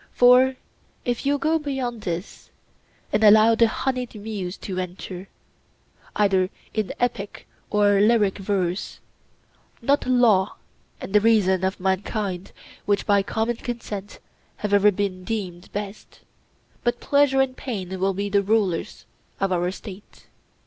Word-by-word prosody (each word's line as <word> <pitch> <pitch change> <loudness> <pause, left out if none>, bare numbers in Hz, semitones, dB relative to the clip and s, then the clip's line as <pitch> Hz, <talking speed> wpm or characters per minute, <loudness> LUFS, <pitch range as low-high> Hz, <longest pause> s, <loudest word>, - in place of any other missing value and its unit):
For 250 +1 +6 0.5
if 245 +2 -1
you 285 +1 +3
go 320 +3 +1
beyond 265 -6 -3
this 175 -1 -5 0.6
and 220 - +2
allow 215 +2 +7
the 230 0 +4
honeyed 250 +1 -3
muse 205 -3 -5
to 185 -2 -5
enter, 185 +1 -6 0.9
either 190 -3 +2 0.2
in 215 -3 -1
epic 235 -5 -3 0.2
or 205 -1 +3
lyric 210 -2 +3
verse, 190 -2 -2 0.8
not 280 +4 +1
law 230 -7 +3 0.4
and 195 - -8
the 210 - +5
reason 200 -4 +3
of 190 +1 -1
mankind, 190 0 -2 0.4
which 205 -1 +1
by 200 -1 +4
common 225 +4 -1
consent 210 -5 -6 0.4
have 210 -1 -3
ever 205 +1 +6
been 190 -2 -3
deemed 185 -5 -5
best, 205 0 -7 0.6
but 240 0 0
pleasure 280 -1 +3
and 265 -1 +1
pain 190 -9 -5
will 195 0 +1
be 200 +1 -2
the 200 0 +2
rulers 200 -4 -1 0.3
in 195 -1 0
our 175 0 +1
State. 195 +1 -11
205 Hz, 135 wpm, -24 LUFS, 190-235 Hz, 0.9 s, allow